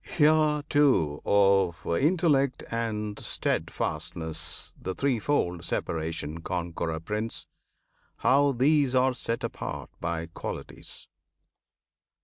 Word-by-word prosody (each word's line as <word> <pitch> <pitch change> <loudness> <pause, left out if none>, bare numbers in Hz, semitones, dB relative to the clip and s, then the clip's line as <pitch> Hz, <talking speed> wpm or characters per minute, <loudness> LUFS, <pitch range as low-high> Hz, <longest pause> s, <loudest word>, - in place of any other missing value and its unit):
Hear, 150 -1 +3
too, 130 - +3
of 95 -3 +3
Intellect 140 - +2
and 105 -3 -2
Steadfastness 80 -1 -2
The 95 - -3
threefold 120 -9 0
separation, 80 -1 -3
Conqueror 85 -2 -3
Prince! 105 +6 -3 0.7
How 140 +2 +4
these 135 +1 +3
are 130 0 +4
set 115 -2 -3
apart - - -5
by 85 -1 -2
Qualities. 80 - -7
105 Hz, 90 wpm, -28 LUFS, 85-140 Hz, 0.7 s, How